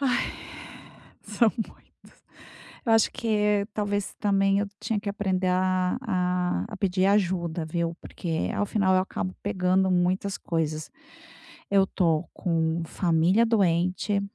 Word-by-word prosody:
Ai. 265 -3 +1 1.0
São 230 -3 +2
muitos. 220 - -10 0.6
Eu 230 - +2
acho 225 -1 +4
que 210 -4 +1
talvez 205 -1 -2
também 195 -1 +2
eu 205 - 0
tinha 215 0 -1
que 205 0 -5
aprender 190 -2 -1
a 185 +2 +1
a 180 -5 0
a 215 - -7
pedir 190 -1 +1
ajuda, 180 -5 +1
viu? 170 +1 -2
Porque 165 -2 -3
ao 205 - 0
final 190 -3 +2
eu 185 - +4
acabo 185 0 -4
pegando 190 -1 +1
muitas 185 +2 +1
coisas. 155 -2 -2 0.8
Eu 195 -1 +4
tô 165 -4 +1
com 165 -1 0
família 175 +7 +2
doente. 185 -1 +1
190 Hz, 130 wpm, -26 LUFS, 175-205 Hz, 1.0 s, acho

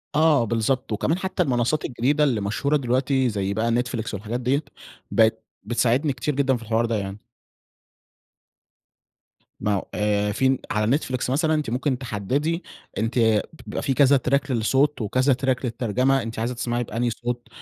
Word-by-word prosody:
آه 155 -4 +4
بالضبط، 115 +3 -1
وكمان 150 +10 0
حتى 185 -1 -1
المنصات 130 +1 0
الجديدة 135 +5 +1
اللي 125 -8 +1
مشهورة 140 +9 0
دلوقتي 130 0 +1
زي 100 -2 -2
بقى 115 +3 0
Netflix 120 -1 -1
والحاجات 110 +4 -3
دِيَّة، 130 +5 0 0.5
بقت 110 0 +3 0.2
بتساعدني 125 +5 +1
كتير 150 +2 -2
جدًا 135 -2 +2
في 115 - -11
الحوار 115 +1 +1
ده 115 -1 -1
يعني. 100 -1 -4 2.4
ما 105 - 0
هو 100 - -2
آآ 105 0 +1
فين 130 +4 +2
على 105 0 +1
نتفليكس 130 -1 0
مثلًا 155 +4 +2
أنتِ 150 -5 -1
ممكن 130 +2 0
تحددي 135 - -2 0.3
أنتِ 110 -2 +2 0.2
بيبقى - - -4
في 135 - 0
كذا 140 +1 +5
تراك 135 +2 0
للصوت 130 +5 +1
وكذا 130 +6 +2
تراك 130 0 -1
للترجمة 125 +3 +1
أنتِ 115 0 -6
عايزة 120 +3 -1
تسمعي 120 0 -1
بأنهي 120 +2 -1
صوت 120 +1 -4
125 Hz, 155 wpm, -24 LUFS, 110-135 Hz, 2.4 s, كذا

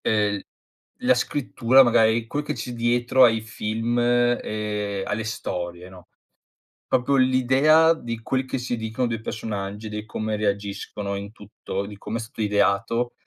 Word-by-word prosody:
ehm, 105 -2 +1 0.6
la - - +5
scrittura, 130 -2 +3
magari, 115 -1 +3
quel 145 +5 -3
che 150 - -3
c'è 125 - -5
dietro 120 +2 +3
ai 115 -2 +4
film 110 +2 -2
e 105 -4 0
alle 110 +1 -2
storie, 90 -5 -5
no, 90 -1 -15 0.8
proprio 130 +2 +2
l'idea 130 +5 +4
di 115 -6 -6
quel 130 +2 -1
che 130 - -3
si 125 -1 -3
dicono 110 +3 -2
dei 115 -2 -3
personaggi, 105 -1 -5
di 105 0 -5
come 110 +1 -3
reagiscono 100 -1 -3
in 100 +1 -7
tutto, 100 -2 -6
di 105 - -9
come 115 - -4
è - - -5
stato 115 0 -9
ideato. 105 +4 +1
110 Hz, 150 wpm, -24 LUFS, 105-120 Hz, 0.8 s, la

